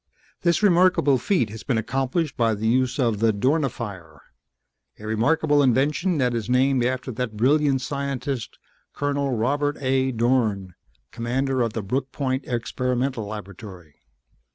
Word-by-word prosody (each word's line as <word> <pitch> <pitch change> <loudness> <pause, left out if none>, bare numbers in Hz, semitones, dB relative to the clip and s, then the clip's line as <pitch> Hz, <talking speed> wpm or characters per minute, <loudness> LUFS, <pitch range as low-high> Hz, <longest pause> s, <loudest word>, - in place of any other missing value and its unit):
"This 170 +3 +1
remarkable 175 -8 +4
feat 145 - 0
has 110 0 -8
been 125 - -1
accomplished 135 +6 -1
by 115 -2 +1
the 110 +2 -2
use 130 +2 +1
of 115 -6 +1
the 115 0 +3
Dornifier. 105 - -2 0.8
A 105 - -11
remarkable 145 +7 +2
invention 145 +7 +2
that 125 -3 +1
is 115 -1 -3
named 130 0 +3
after 130 +1 -2
that 115 -2 -4
brilliant 135 +2 +2
scientist, 140 -3 -4 0.4
Colonel 140 -3 -1
Robert 145 +5 0
A. 130 -1 +1
Dorn, 115 -6 0 0.4
Commander 130 +3 -1
of 115 -2 0
the 110 - -3
Brooke 130 +6 -2
Point 130 -1 -2
Experimental 125 -1 -2
Laboratory. 100 -6 -10
130 Hz, 135 wpm, -23 LUFS, 115-140 Hz, 0.8 s, remarkable